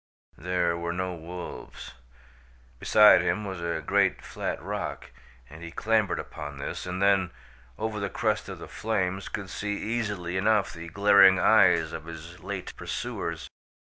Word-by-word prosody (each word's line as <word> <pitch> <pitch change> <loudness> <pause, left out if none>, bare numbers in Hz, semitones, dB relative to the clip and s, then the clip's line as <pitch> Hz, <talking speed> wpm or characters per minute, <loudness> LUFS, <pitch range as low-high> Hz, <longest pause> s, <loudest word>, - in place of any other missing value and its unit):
There 90 0 0
were 85 0 -3
no 90 +1 -2
wolves. 85 -5 -8 0.9
Beside 105 -1 +7
him 105 - -1
was 95 -3 -5
a 85 0 -2
great - - +2
flat - - -4
rock, - - -5 0.4
and 80 +5 -12
he 85 - -7
clambered 110 +3 +1
upon 75 -1 -7
this, 70 - -5
and 90 +1 -3
then, 100 -2 +3 0.5
over 110 -1 -3
the 100 -1 -2
crest - - -1
of - - -6
the - - -9
flames 95 -3 -2
could 100 -3 -6
see 105 0 -3
easily 105 -6 -2
enough 105 -2 +2
the 85 0 -8
glaring 100 0 +6
eyes - - +4
of - - -6
his 85 +1 -10
late 95 +1 -6
pursuers. 85 -1 -4
95 Hz, 150 wpm, -27 LUFS, 85-100 Hz, 0.9 s, Beside